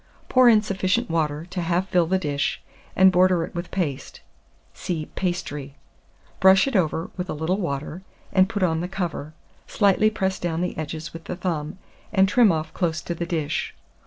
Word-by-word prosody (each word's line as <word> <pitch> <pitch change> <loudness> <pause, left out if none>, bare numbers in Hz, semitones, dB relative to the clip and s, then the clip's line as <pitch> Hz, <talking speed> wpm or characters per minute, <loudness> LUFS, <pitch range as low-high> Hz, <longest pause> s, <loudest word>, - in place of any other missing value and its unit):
Pour 255 -1 +6
in 215 -2 +5
sufficient 195 +2 0
water 155 -1 -1
to 185 0 -5
half 175 +2 0
fill 175 -2 +3
the 190 +3 +2
dish, 145 -5 -1 0.4
and 190 0 +6
border 180 -1 +3
it - - -7
with 170 0 -5
paste 145 -8 -4 0.5
(see 160 -4 -4
Pastry); 150 -6 -3 0.6
brush 190 0 +6
it 270 - -2
over 165 -2 0
with 180 0 -4
a - - -2
little 160 +5 -1
water, 150 0 -4 0.3
and 190 0 +4
put 205 -3 -2
on 160 -3 +1
the 175 - -3
cover; 175 -5 -4 0.3
slightly 205 +1 +3
press 190 -3 -2
down 170 -1 -2
the 180 - -2
edges 155 +1 -5
with 165 0 -9
the - - -4
thumb, 170 -2 -3 0.3
and 195 -2 +4
trim 220 0 +5
off 155 -1 -3
close 170 -3 -1
to 170 - -3
the 170 0 -4
dish. 155 -3 -2
175 Hz, 185 wpm, -24 LUFS, 160-190 Hz, 0.6 s, Pour